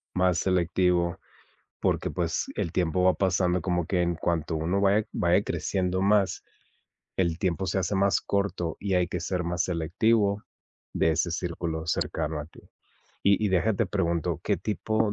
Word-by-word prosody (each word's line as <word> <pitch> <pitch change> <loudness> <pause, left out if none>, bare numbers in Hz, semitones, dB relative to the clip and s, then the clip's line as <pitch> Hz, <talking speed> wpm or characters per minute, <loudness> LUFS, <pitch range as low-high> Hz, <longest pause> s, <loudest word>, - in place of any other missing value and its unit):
Más 90 -2 +2
selectivo, 90 -1 +1 0.6
porque, - - 0
pues, - - -1
el 85 - -2
tiempo 90 0 +1
va 95 - +5
pasando 90 -2 +1
como 90 -2 -1
que 90 -2 +1
en 85 0 +1
cuanto 80 -1 -1
uno 85 +5 0
va 100 +1 +4
e 110 - -4
va 85 - 0
creciendo 95 -1 -1
más, 100 0 +2 0.7
el 85 -3 +1
tiempo 95 +1 -1
se 90 +3 0
hace 95 +2 -1
más 100 +1 +3
corto 100 -5 -1
y 100 -1 -3
hay 90 -1 +2
que 90 - -3
ser 90 0 -2
más 85 +1 -1
selectivo 100 +5 +1 0.5
de 80 - +2
ese 85 +2 0
círculo 85 -1 -3
cercano 75 -1 -1
a 75 - -6
ti. - - -17 0.6
Y 100 +2 +3
y - - +2
deja 95 +4 +2
te 115 - +1
pregunto, 85 -4 -1
¿qué - - +1
tipo 110 0 -1
90 Hz, 170 wpm, -27 LUFS, 85-100 Hz, 0.7 s, va